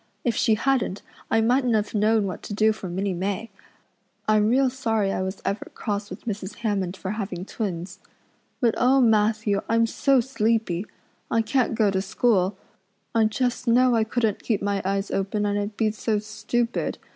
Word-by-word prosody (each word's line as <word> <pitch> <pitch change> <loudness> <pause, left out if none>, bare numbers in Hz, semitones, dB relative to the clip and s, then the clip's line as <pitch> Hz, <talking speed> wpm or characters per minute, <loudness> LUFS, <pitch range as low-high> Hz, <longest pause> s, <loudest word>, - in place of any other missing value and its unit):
If 240 - +1
she 220 - +3
hadn't 230 -4 0 0.3
I 225 - +3
mightn't 245 +1 +2
have 210 -1 -1
known 215 0 +3
what 185 - -5
to 205 - -6
do 220 +1 +4
for 195 -4 -7
Minnie 190 +2 -1
May. 195 +5 -3 0.8
I'm 215 0 +4
real 265 +3 +4
sorry 225 -6 0
I 185 - -1
was 190 +1 -4
ever 200 - -2
cross 205 -1 -3
with - - -9
Mrs. 205 -2 -4
Hammond 195 -3 -1
for 190 - -4
having 195 -4 -4
twins. 190 -3 -4 0.6
But, 235 -4 +3
oh, 260 +2 +4
Matthew, 215 -3 +3
I'm 230 0 +4
so 270 +3 +2
sleepy. 220 -6 0 0.4
I 230 -1 +2
can't 250 +1 +1
go 215 -3 +3
to 190 -1 0
school. 195 -2 +1 0.6
I 225 -1 +4
just 245 +3 -1
know 250 +2 +5
I 225 -1 +3
couldn't 220 -2 -1
keep 220 -4 0
my 200 -1 0
eyes 195 +1 -1
open 200 +2 -1
and 205 0 0
I'd 205 +1 -4
be 220 -2 +2
so 215 0 -1
stupid. 220 +3 -2
215 Hz, 180 wpm, -24 LUFS, 200-230 Hz, 0.8 s, know